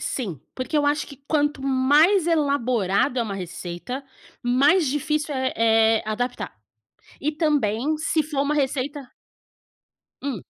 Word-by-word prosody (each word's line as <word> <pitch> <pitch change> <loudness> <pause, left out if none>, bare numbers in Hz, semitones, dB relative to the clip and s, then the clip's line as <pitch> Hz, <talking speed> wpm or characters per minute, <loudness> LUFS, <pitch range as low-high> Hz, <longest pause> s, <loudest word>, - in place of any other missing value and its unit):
Sim, 190 - -4
porque 255 +4 -3
eu 290 -1 +2
acho 290 +1 +1
que 280 - -11
quanto 295 -2 +1
mais 290 +8 +4
elaborada 255 - +1
é - - +2
uma 210 -3 -4
receita, 180 +7 -6 0.4
mais 280 +8 +4
difícil 300 +2 -1
é 260 0 -1 0.5
é - - -11
adaptar. 245 - -3 0.7
E 300 - 0
também 295 -3 0
se 315 0 0
for 290 -2 -2
uma 290 +1 0
receita 280 0 -1 1.2
Hum. 265 -9 -4
280 Hz, 130 wpm, -24 LUFS, 245-300 Hz, 1.2 s, mais